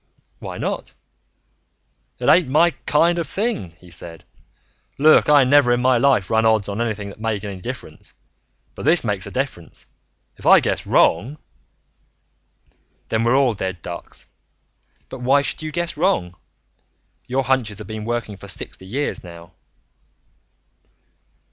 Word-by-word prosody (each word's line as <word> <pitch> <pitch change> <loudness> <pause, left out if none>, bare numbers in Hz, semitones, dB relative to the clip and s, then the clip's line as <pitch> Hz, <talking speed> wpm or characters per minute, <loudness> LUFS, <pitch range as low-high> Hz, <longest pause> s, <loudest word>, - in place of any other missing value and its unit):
"Why - - -7
not?" - - -4 1.2
"It - - -4
ain't 175 -4 +5
my 165 +5 +4 0.2
kind 170 +3 +3
of 165 - -3
thing," 200 - -3
he 90 -1 -16
said. 85 0 -7 0.7
"Look, 155 +1 +5
I 145 -2 +7
never 130 -1 +4
in 120 - +2
my 130 -1 +4
life 125 -8 +2
run 110 0 +3
odds 110 -2 +2
on 105 +2 -3
anything 105 -3 -3
that 100 - -13
made 110 -2 -2
any 95 -2 -7
difference. - - -9 0.6
But - - -9
this 165 +3 +4
makes 100 -4 -2
a - - -8
difference. 130 - -5 0.5
If - - -13
I - - +8
guess - - -2
wrong 120 - +2 0.8
" - - -41
"Then 110 0 0
we're 120 +3 +3
all 135 -4 +3
dead 95 -4 -5
ducks. 85 -1 -9 0.8
But 130 - -9
why 135 +3 +3
should - - -3
you 155 0 -5
guess 170 +1 -2
wrong? 150 - 0 0.9
Your 130 +2 0
hunches 125 -6 0
have 105 - -6
been 110 +2 -6
working 115 -3 -3
for 100 - -12
sixty 95 0 -7
years 140 +8 -3
now." 85 -1 -12
115 Hz, 150 wpm, -21 LUFS, 100-140 Hz, 1.2 s, I